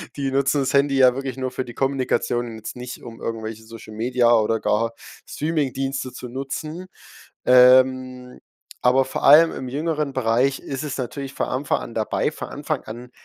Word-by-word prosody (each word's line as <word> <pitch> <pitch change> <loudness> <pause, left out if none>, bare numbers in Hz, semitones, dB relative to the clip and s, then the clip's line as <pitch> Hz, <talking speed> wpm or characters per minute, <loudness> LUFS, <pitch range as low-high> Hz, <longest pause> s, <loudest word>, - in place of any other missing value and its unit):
Die 135 -2 -2
nutzen 140 +1 +1
das 135 - -1
Handy 140 -1 +3
ja 130 -1 +6
wirklich 135 0 -5
nur 130 -1 -3
für 130 - -3
die 120 - -9
Kommunikation 130 -3 0
und 115 - -8
jetzt 110 - -8
nicht, 125 0 -8
um 115 -1 -11
irgendwelche 110 -1 -5
Social 110 -1 -11
Media 120 +1 +2
oder 110 0 +2
gar 115 +2 0 0.3
Streamingdienste 135 -4 -2
zu 125 - -8
nutzen. 150 +7 -6 0.6
Ähm, 125 0 +4 0.4
aber 130 +1 +4
vor 130 - -5
allem 160 +3 +7
im 130 - -6
jüngeren 150 0 -2
Bereich 130 +2 +1
ist 135 +2 -5
es 145 -2 -4
natürlich 135 +2 -5
vor - - -2
Anfang 135 +2 -1
an 115 - -8
dabei. 110 -1 0
Von - - -7
Anfang - - -4
an 120 +3 -9
130 Hz, 175 wpm, -22 LUFS, 120-135 Hz, 0.6 s, allem